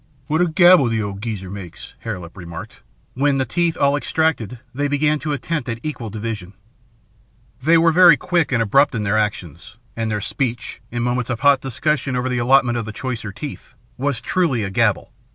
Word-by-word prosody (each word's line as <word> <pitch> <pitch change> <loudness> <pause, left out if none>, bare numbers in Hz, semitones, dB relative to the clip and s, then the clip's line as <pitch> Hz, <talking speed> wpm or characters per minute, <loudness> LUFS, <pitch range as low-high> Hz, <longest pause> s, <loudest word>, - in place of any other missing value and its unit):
"What 155 +4 0
a 180 - +3
gabble 175 -4 +6
the 115 -2 0
old 100 -1 -5
geezer 105 -5 -5
makes," 90 -4 -9
Hare 110 -4 -4
Lip 85 -2 -11
remarked, 85 -3 -9 0.3
when, 140 +1 +1
the 130 - 0
teeth 170 +6 0
all 140 0 +3
extracted, 145 -7 -1 0.2
they 145 +3 -1
began 150 +1 +1
an 155 - -2
attempt 145 0 -3
at 115 0 -3
equal 135 -7 -5
division. 105 -3 -6 1.1
They 165 +5 +5
were 165 0 +4
very 175 -2 +7
quick 175 -5 0
and 115 -3 +2
abrupt 140 +6 +3
in 110 - -1
their 105 +1 +1
actions, 95 -3 -4 0.2
and 115 -1 -2
their 105 -1 -1
speech, 120 +2 -3
in 120 0 -3
moments 125 0 -1
of 120 -2 -3
hot 140 -2 +5
discussion 135 +1 -1
over 125 +1 -1
the 125 -1 -1
allotment 120 -1 +3
of 115 - -4
the 110 - -6
choicer 115 -2 -5
teeth, 135 0 -9 0.2
was 135 -2 -2
truly 160 - 0
a 95 - -4
gabble. - - +1
125 Hz, 195 wpm, -20 LUFS, 110-145 Hz, 1.1 s, very